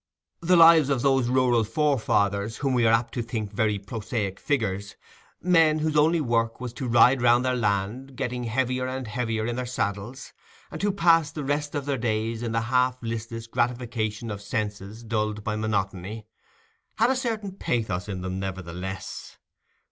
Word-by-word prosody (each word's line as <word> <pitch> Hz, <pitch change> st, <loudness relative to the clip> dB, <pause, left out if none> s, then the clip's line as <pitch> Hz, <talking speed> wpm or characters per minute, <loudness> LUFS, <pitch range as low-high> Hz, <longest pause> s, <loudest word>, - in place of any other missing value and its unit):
The 175 Hz, +2 st, +3 dB
lives 165 Hz, -3 st, +7 dB
of 135 Hz, -3 st, 0 dB
those 135 Hz, -3 st, +3 dB
rural 125 Hz, -2 st, +3 dB
forefathers, 110 Hz, -6 st, 0 dB
whom 135 Hz, -2 st, 0 dB
we 120 Hz, -2 st, +3 dB
are -, -, +5 dB
apt 115 Hz, +1 st, +1 dB
to 120 Hz, -, -2 dB
think 110 Hz, -3 st, -4 dB
very 105 Hz, 0 st, +1 dB
prosaic 105 Hz, -1 st, -4 dB
figures—men 145 Hz, -, 0 dB
whose 155 Hz, 0 st, -1 dB
only 160 Hz, +3 st, +4 dB
work 115 Hz, -5 st, 0 dB
was 125 Hz, -2 st, -5 dB
to 130 Hz, +1 st, -5 dB
ride 125 Hz, +2 st, +5 dB
round 120 Hz, +1 st, +4 dB
their 130 Hz, 0 st, +1 dB
land, 110 Hz, +4 st, -1 dB
getting 125 Hz, 0 st, -3 dB
heavier 130 Hz, +2 st, -1 dB
and 130 Hz, 0 st, -4 dB
heavier 110 Hz, -1 st, -2 dB
in 120 Hz, +1 st, -2 dB
their 125 Hz, -1 st, -3 dB
saddles, 110 Hz, +2 st, -4 dB, 0.4 s
and -, -, -6 dB
who 205 Hz, 0 st, +2 dB
passed 165 Hz, -5 st, +3 dB
the 150 Hz, -, -3 dB
rest 145 Hz, +2 st, -2 dB
of 145 Hz, -2 st, -2 dB
their 140 Hz, -3 st, -1 dB
days 110 Hz, 0 st, -1 dB
in 120 Hz, -1 st, -3 dB
the 115 Hz, 0 st, 0 dB
half 125 Hz, +2 st, +1 dB
listless 115 Hz, 0 st, -5 dB
gratification 115 Hz, -2 st, -2 dB
of 100 Hz, -1 st, -6 dB
senses 105 Hz, 0 st, -4 dB
dulled 105 Hz, -2 st, -2 dB
by 105 Hz, 0 st, -2 dB
monotony—had 110 Hz, -, -4 dB
a -, -, +1 dB
certain 225 Hz, -6 st, -2 dB
pathos 110 Hz, -, -2 dB
in 95 Hz, -2 st, -4 dB
them 95 Hz, +1 st, -4 dB
nevertheless. 95 Hz, 0 st, -6 dB
120 Hz, 165 wpm, -26 LUFS, 105-130 Hz, 0.4 s, lives